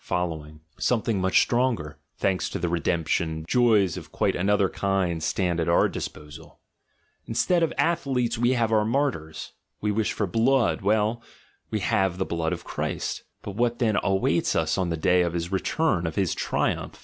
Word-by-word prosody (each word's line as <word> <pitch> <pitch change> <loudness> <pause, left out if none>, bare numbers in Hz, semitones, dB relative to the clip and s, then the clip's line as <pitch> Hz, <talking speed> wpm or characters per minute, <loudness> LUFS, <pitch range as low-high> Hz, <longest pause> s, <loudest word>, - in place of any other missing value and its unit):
— 75 +1 -18
some 120 -3 +1
thing 105 -5 0
much 95 0 +4
stronger; 115 - -1 0.2
thanks 95 -2 0
to - - -4
the 85 - -2
redemption, 80 -1 -1
joys 110 -8 +3
of - - -9
quite - - 0
another 100 +1 +2
kind 95 -4 -1
stand 85 +1 0
at 85 0 0
our 85 - +4
disposal; 75 0 -8 0.7
instead 170 +10 +1
of 165 - +2
athletes 130 -8 +1
we 120 +2 +2
have 115 -3 +1
our 110 -1 +3
martyrs; 110 - -2 0.3
we 105 - 0
wish 105 +1 0
for 105 - -1
blood, 115 +5 +2
well, 110 +3 +1 0.5
we 110 - -2
have 95 -1 +1
the 95 - -1
blood 80 -1 -2
of - - -4
Christ - - -3
— - - -51
but 100 - -6
what 120 +1 +1
then 110 -4 +1
awaits 95 -3 +1
us 80 0 +1
on 95 -3 -1
the 85 - -2
day 90 +3 +3
of 85 -1 0
his 85 +1 -3
return, 95 - 0
of 80 - -5
his 95 -4 +1
triumph? - - -2
95 Hz, 180 wpm, -25 LUFS, 85-115 Hz, 0.7 s, much